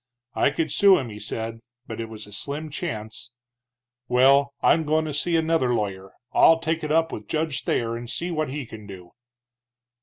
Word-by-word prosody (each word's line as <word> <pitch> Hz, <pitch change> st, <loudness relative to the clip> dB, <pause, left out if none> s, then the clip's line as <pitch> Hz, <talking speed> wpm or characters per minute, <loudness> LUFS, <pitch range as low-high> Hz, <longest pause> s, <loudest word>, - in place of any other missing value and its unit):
I -, -, +3 dB
could 155 Hz, +1 st, -2 dB
sue 200 Hz, +3 st, +6 dB
him, 130 Hz, -4 st, -4 dB
he 105 Hz, -1 st, -9 dB
said, 115 Hz, +1 st, -5 dB, 0.3 s
but 115 Hz, -2 st, -6 dB
it 115 Hz, -, -6 dB
was 110 Hz, -1 st, -8 dB
a 105 Hz, -, -13 dB
slim 145 Hz, +7 st, -4 dB
chance. 115 Hz, -7 st, -6 dB, 0.7 s
Well, 135 Hz, +3 st, +4 dB
I'm 160 Hz, -, +4 dB
goin' 155 Hz, +1 st, +1 dB
to 155 Hz, -, -4 dB
see 170 Hz, +4 st, 0 dB
another 160 Hz, -6 st, +2 dB
lawyer 95 Hz, -3 st, -4 dB, 0.2 s
I'll 165 Hz, -, +6 dB
take 165 Hz, 0 st, -2 dB
it 150 Hz, -, -2 dB
up 165 Hz, +1 st, +2 dB
with 105 Hz, -1 st, -7 dB
Judge 155 Hz, -4 st, -2 dB
Thayer, 115 Hz, 0 st, 0 dB
and 120 Hz, 0 st, -7 dB
see 175 Hz, +8 st, -3 dB
what 155 Hz, -3 st, -1 dB
he 140 Hz, 0 st, -4 dB
can 110 Hz, -2 st, -11 dB
do." 90 Hz, -3 st, -11 dB
140 Hz, 190 wpm, -24 LUFS, 110-160 Hz, 0.7 s, sue